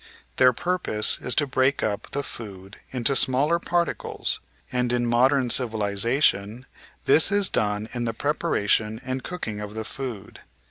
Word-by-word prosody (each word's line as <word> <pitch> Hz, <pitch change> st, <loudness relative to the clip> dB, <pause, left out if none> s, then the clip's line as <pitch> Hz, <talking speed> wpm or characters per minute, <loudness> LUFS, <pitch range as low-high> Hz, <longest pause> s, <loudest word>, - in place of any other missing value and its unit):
Their 130 Hz, -1 st, +6 dB
purpose 165 Hz, -7 st, 0 dB
is 125 Hz, -, +1 dB
to 145 Hz, -, +2 dB
break 135 Hz, 0 st, +1 dB
up 105 Hz, -2 st, -3 dB
the 140 Hz, -, -3 dB
food 100 Hz, -6 st, -10 dB
into 130 Hz, +2 st, +2 dB
smaller 140 Hz, +7 st, +2 dB
par 175 Hz, 0 st, +1 dB
ticles, -, -, -4 dB, 0.3 s
and 125 Hz, -1 st, 0 dB
in 120 Hz, 0 st, +1 dB
modern 125 Hz, +2 st, +2 dB
civilisation 110 Hz, 0 st, +1 dB, 0.4 s
this 160 Hz, +7 st, +6 dB
is 200 Hz, -1 st, +3 dB
done 105 Hz, +1 st, -1 dB
in 120 Hz, -1 st, -3 dB
the 115 Hz, -, -2 dB
preparation 110 Hz, -7 st, 0 dB
and 130 Hz, 0 st, -4 dB
cooking 115 Hz, -, -5 dB
of 105 Hz, 0 st, -7 dB
the 110 Hz, 0 st, -4 dB
food. 120 Hz, -5 st, -7 dB
125 Hz, 150 wpm, -24 LUFS, 110-140 Hz, 0.4 s, Their